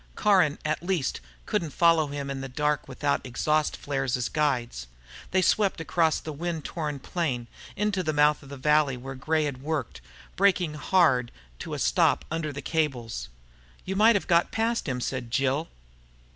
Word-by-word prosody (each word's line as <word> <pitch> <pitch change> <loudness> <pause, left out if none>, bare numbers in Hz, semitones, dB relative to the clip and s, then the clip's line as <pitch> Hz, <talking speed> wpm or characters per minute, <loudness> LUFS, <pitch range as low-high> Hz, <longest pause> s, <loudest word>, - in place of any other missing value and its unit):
Caron, 185 -8 +3
at 155 0 0
least, 175 -5 -1 0.2
couldn't 165 - -1
follow 165 -3 +4
him 140 -1 -4
in 135 -1 -4
the 135 - -6
dark 150 +3 -1
without 140 +2 -1
exhaust 150 +4 0
flares 135 -3 -1
as 125 - -2
guides. 125 - -1 0.4
They 185 0 +2
swept 200 0 +2
across 165 -1 +1
the 155 - -7
wind 165 0 -4
torn 150 -4 -3
plain, 135 -4 -2 0.3
into 205 -2 0
the 155 -3 -1
mouth 150 0 +3
of 140 - -14
the 140 - -8
valley 150 -1 +2
where 135 +2 -7
Gray 155 +4 0
had 140 -3 -4
worked, 150 - -3 0.3
braking 185 -5 +2
hard 150 -6 +2 0.3
to - - -5
a - - -4
stop - - +2
under 160 -2 -2
the 140 -1 -7
cables. 130 - -2 0.6
"You 190 - -3
might 220 +3 +6
have 200 - 0
got 170 -1 +3
past 230 +1 0
them," 125 -2 -2
said 125 -2 -3
Jill. 135 +5 0
150 Hz, 170 wpm, -27 LUFS, 135-170 Hz, 0.6 s, might